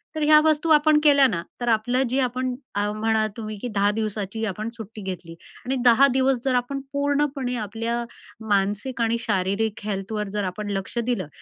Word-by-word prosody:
तर 310 - -3
ह्या 305 0 +7
वस्तू 310 +1 +2
आपण 300 0 +5
केल्या 280 -2 +6
ना, 180 -9 -2 0.2
तर 240 - -2
आपलं 245 +4 +2
जे 260 +3 0
आपण 255 0 -1 0.2
अ, 205 +1 0
म्हणा 220 +1 +1
तुम्ही 215 -2 -5
की - - -3
10 200 +1 +3
दिवसाची 215 0 -3
आपण 215 +2 -4
सुट्टी 220 -2 -9
घेतली 180 -3 -6 0.3
आणि 260 +2 -1
10 245 +3 +7
दिवस 260 -1 +2
जर 260 -2 +2
आपण 250 +3 -1
पूर्णपणे 280 -2 0
आपल्या 230 +3 -3 0.5
मानसिक 205 +5 0
आणि 230 0 +1
शारीरिक 205 0 -1
हेल्थवर 210 +1 -3
जर 210 -1 -1
आपण 205 +3 -4
लक्ष 195 +5 -6
दिलं, 235 -7 -1
225 Hz, 180 wpm, -24 LUFS, 205-260 Hz, 0.5 s, ह्या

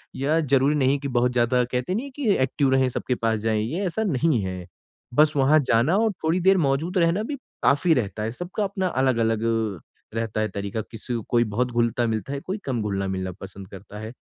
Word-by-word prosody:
या 150 +4 +1
ज़रूरी 140 -1 +2
नहीं 135 -1 +2
कि 140 - -4
बहुत 125 -1 +1
ज़्यादा 125 +1 +2
कहते 125 +9 -1
नहीं 235 +6 -2
है 280 - -9
कि 230 -9 +2
एक्टिव 135 +1 +1
रहें 130 0 +3
सबके 125 +1 -2
पास 115 -2 0
जाएँ, 110 0 0
ये 165 - -2
ऐसा 190 +5 -1
नहीं 155 - +1
है। 90 -1 -5 0.5
बस 150 +3 +4
वहाँ 140 +3 +5
जाना 120 +10 +3
और 220 0 +2
थोड़ी 160 +3 +2
देर 190 +2 +4
मौजूद 160 +4 0
रहना 170 +4 +2
भी 285 +6 -4 0.3
काफ़ी 160 +4 +4
रहता 105 -5 -2
है। 110 - -2
सबका 175 - -4
अपना 195 -1 -1
अलग-अलग 115 -7 +1
अ, 110 -5 -1 0.4
रहता 110 -1 -1
है 110 - 0
तरीका 100 +2 -4
किसी 115 +2 -6
को 115 - -2
कोई 120 -1 +3
बहुत 125 +2 0
घुलता-मिलता 115 0 0
है, 140 - -3
कोई 185 +8 -4
कम 125 -4 -1
घुलना-मिलना 95 -2 -2
पसंद 95 0 -9
करता 100 +1 -10
है। 110 +1 -6
125 Hz, 210 wpm, -24 LUFS, 110-160 Hz, 0.5 s, वहाँ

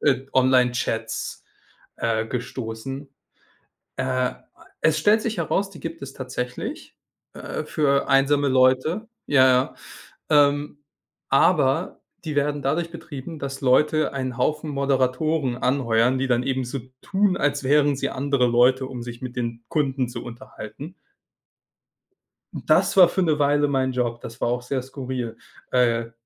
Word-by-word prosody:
äh, 135 -2 +1
Online-Chats, 125 -3 +1 0.5
äh, 110 -1 -1
gestoßen. 125 +2 -5 0.9
Äh, 130 - -1
a 130 -1 -1 0.4
es 155 -1 +3
stellt 210 +8 +4
sich 225 -1 -2
heraus, 195 0 0
die 170 - -12
gibt 165 0 -6
es 135 0 -8
tatsächlich, 125 -1 -6 0.4
äh, - - -5
für 140 -2 +1
einsame 140 +1 +3
Leute, 130 - +2 0.2
ja, 130 -2 +4 0.6
ja, 145 -2 +7
ähm, 145 0 -5 0.5
aber - - +2 0.2
die 155 - -4
werden 145 0 +1
dadurch 165 +5 -1
betrieben, 160 -2 -8
dass 135 -1 -5
Leute 150 +4 +3
einen 130 -2 -3
Haufen 155 +3 0
Moderatoren 135 0 0
anheuern, 125 -1 +2
die 135 - 0
dann 120 -1 +2
eben 130 0 -1
so 125 +2 -4 0.2
tun, 195 -1 +1
als 145 0 0
wären 145 +1 +3
sie 140 +1 -2
andere 140 -1 +1
Leute, 125 +2 +3
um 125 -2 -7
sich 120 0 -8
mit 125 -1 -6
den 115 -1 -3
Kunden 135 -4 0
zu 120 - -7
unterhalten. 125 - -9 1.6
Das - - +2
war 180 -2 +9
für 185 +2 0
'ne 155 -3 +1
Weile 145 0 +3
mein 130 -1 +1
Job, 120 -2 -1
das 115 +2 -9
war - - +1
auch 120 0 -1
sehr 130 +2 -2
skurril, 130 -3 -5 0.3
äh 115 -2 +2
130 Hz, 140 wpm, -23 LUFS, 125-145 Hz, 1.6 s, war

